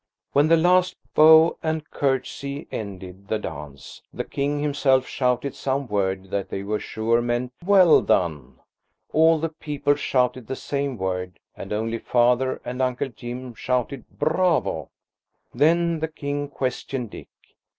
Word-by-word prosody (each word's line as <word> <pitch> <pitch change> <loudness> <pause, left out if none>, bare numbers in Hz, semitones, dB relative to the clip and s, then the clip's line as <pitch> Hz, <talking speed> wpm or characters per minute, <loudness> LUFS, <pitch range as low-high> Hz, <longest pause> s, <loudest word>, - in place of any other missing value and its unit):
When 145 +2 +4
the 165 +1 +5
last 180 +2 +3 0.2
bow 160 +1 +7
and 160 -1 -2
curtsey 140 +1 -2
ended 95 -2 -7
the 110 - 0
dance, 75 -6 -9
the - - -4
King 145 +1 -2
himself 140 -3 +2
shouted 125 +1 -1
some 135 +1 -2
word 95 -2 -2
that 100 -1 -2
they 95 - -4
were 105 +1 -2
sure 115 +2 0
meant, 120 +1 -2
"Well 185 -3 +6
done!" 80 -7 0 0.6
All 160 +1 +5
the 165 +1 -2
people 150 -2 -1
shouted 130 -4 0
the 130 - -3
same 140 -2 -3
word, 90 -1 -3 0.2
and 95 - -9
only 115 +2 -2
Father 125 +2 +2
and 125 +1 -4
Uncle 130 +1 -1
Jim 120 +1 -7
shouted 125 +2 -2
"Bravo!" 155 - +1 0.6
Then 165 +5 +2
the 160 - -1
King 145 -2 -4
questioned 130 -3 -3
Dick. - - -10
130 Hz, 140 wpm, -24 LUFS, 110-150 Hz, 0.6 s, bow